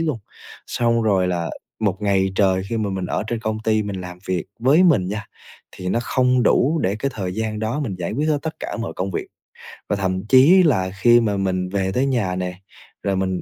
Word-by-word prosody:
luôn. 155 -8 -1 0.5
Xong 115 -1 +1
rồi 95 -4 +2
là 85 -2 -2 0.3
một 105 -1 -1
ngày 95 -2 +1
trời 95 -1 +2
khi 115 - -1
mà 105 -2 -1
mình 95 -2 -3
ở - - -1
trên 115 0 -3
công 110 -1 -2
ty 110 -1 +2
mình 100 -2 -5
làm 90 0 -8
việc 90 -3 -1 0.2
với 140 +8 +5
mình 130 - +3
nha, 105 +2 -4 0.5
thì 90 - -5
nó 115 - +1
không 125 0 +2
đủ 150 +8 +3
để 95 +3 0
cái 135 +5 -2
thời 95 -4 -3
gian 110 0 -2
đó 110 +7 -2
mình 115 -9 -3
giải 85 - -3
quyết 150 +6 -1
hết 150 -2 +2
tất 160 -1 -4
cả - - -4
mọi 115 - -4
công 95 +1 -2
việc - - -3 0.6
và - - +1
thậm 95 0 -2
chí 145 - +7
là 95 - +2
khi 120 +1 +6
mà 105 -4 0
mình 95 -1 -1
về 95 0 -1
tới 130 +6 +1
nhà 110 -9 0
nè, 90 0 -4 0.4
rồi 100 -1 0
mình 95 -1 -1
105 Hz, 230 wpm, -21 LUFS, 95-120 Hz, 0.6 s, chí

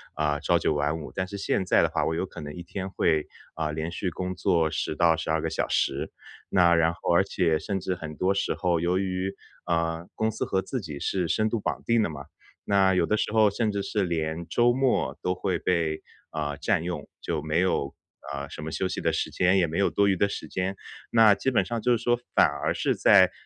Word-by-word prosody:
啊， 75 0 0
朝 85 0 +2
九 - - +1
晚 75 +2 0
五。 75 - -8
但 95 - -1
是 100 +2 -6
现 100 -1 0
在 - - +4
的 - - +3
话， - - 0
我 - - 0
有 85 - -1
可 90 - -10
能 75 0 -7
一 90 - -8
天 95 +2 -5
会， 80 -5 +1 0.3
啊， 80 -2 -2
连 80 +2 -3
续 90 +2 -3
工 90 +3 -4
作 85 -3 +2
10-12 80 0 +1
个 - - -1
小 - - -1
时。 - - 0 0.4
那 85 -2 +5
然 85 0 +3
后 85 - -1
而 85 +3 +5
且， 85 -5 +1
甚 95 +4 -3
至 90 0 -2
很 80 -3 -7
多 95 +1 +2
时 100 - 0
候， 90 -3 0
由 90 +2 +1
于， 95 0 -2 0.3
呃， 85 0 -1
公 110 0 0
司 - - -3
和 95 - 0
自 125 +4 -4
己 75 -5 -7
是 90 +2 -1
深 110 0 +1
度 115 0 -1
绑 - - -2
定 115 -1 +3
的 90 - 0
嘛， 70 -2 -8 0.4
那 95 -1 +3
有 90 -2 +2
的 105 - +1
时 - - -1
候 110 -2 +5
甚 110 +2 -1
至 100 -1 -2
是 105 +1 -1
连 80 -1 -2
周 120 0 +3
末 130 0 +1
都 90 - +1
会 95 0 -1
被， 85 -3 -1 0.3
啊， 75 -2 -3
占 - - 0
用。 85 -4 -5
就 80 -3 -2
没 80 +1 -1
有， 70 -7 0 0.4
啊， 70 0 -4
什 - - -8
么 80 +1 -5
休 95 - -1
息 - - -3
的 - - +1
时 - - -1
间， 90 +2 +3
也 90 -3 +3
没 80 +5 -3
有 100 - +3
多 100 - +2
余 95 - +2
的 100 - +3
时 100 - -6
间。 95 +1 -2 0.4
那 110 -3 +7
基 100 +6 -1
本 110 -7 +2
上 115 +4 -3
就 125 +1 +3
是 115 - -10
说 120 0 +2 0.2
反 - - +7
而 70 0 -2
是 - - 0
在 - - +6
90 Hz, 255 characters per minute, -26 LUFS, 80-100 Hz, 0.4 s, 那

